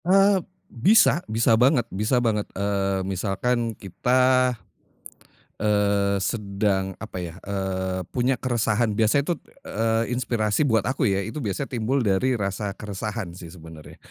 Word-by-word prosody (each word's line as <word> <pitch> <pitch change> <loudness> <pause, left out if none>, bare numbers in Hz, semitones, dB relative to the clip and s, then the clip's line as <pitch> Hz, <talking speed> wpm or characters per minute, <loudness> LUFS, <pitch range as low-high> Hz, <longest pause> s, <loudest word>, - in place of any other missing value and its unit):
Eee, 195 +1 +4 0.3
bisa 180 - +4
bisa 115 +2 +2
banget 125 -1 +4
bisa 105 +6 +1
banget, 110 -4 0
eee, 100 -1 -1
misalkan 110 +4 -1
kita, 125 +5 +2 1.0
eee, 100 -1 +1
sedang 100 -2 -1
apa 110 -3 -7
ya, 85 -1 -7
eee, 95 -2 -3
punya 130 +1 +1
keresahan 115 -2 0
biasanya 115 +9 +2
tut, 170 - -2 0.2
eee, 115 +2 -1
itu 125 - -1
inspirasi 115 +1 0
buat 110 -5 +2
aku 130 +3 0
ya, 100 -1 0
itu 110 +9 -6
biasa 115 +2 -3
timbul 125 +2 0
dari 110 +5 +1
rasa 100 -1 -3
keresahan 105 -1 -5
sih, 85 0 -10
sebenarnya. 80 -2 -12
110 Hz, 135 wpm, -24 LUFS, 100-125 Hz, 1.0 s, Eee